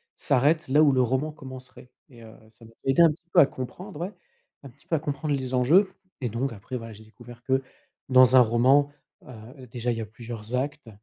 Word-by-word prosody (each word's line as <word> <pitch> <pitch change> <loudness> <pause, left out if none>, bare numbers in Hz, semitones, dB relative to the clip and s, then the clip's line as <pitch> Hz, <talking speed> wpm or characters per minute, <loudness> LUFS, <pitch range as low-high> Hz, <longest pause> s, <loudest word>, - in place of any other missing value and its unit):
s'arrête, 150 +5 +1
là 145 +3 +4
où 150 -2 +5
le 130 -1 +2
roman 130 +5 0
commencerait» 130 -3 -12 0.2
et 120 -3 -15
heu, 110 -1 -13 0.2
ça 115 - -21
m'a 115 - -15
aidé 135 +5 +3
un 165 - +7
petit 170 +3 -13
peu 180 - +6
à - - +7
comprendre, 150 +8 -8
ouais, 185 +5 -5 0.5
un 140 - -10
petit 130 +3 -25
peu 165 - 0
à - - 0
comprendre 150 0 -3
les 130 -2 -5
enjeux, 155 +11 +4 0.3
et 125 - -2
donc, 120 +3 -3
après 115 +5 -7
voilà, 115 -1 -9
j'ai 110 +1 -14
découvert 120 +2 -15
que 130 +1 +1 0.5
dans 130 0 +6
un - - +9
roman, 125 +5 +3 0.4
heu, 125 +2 -12
déjà 120 +1 -3
il 115 - -3
y - - -3
a - - -4
plusieurs 115 +1 -8
actes 140 0 -4
130 Hz, 225 wpm, -25 LUFS, 120-145 Hz, 0.5 s, un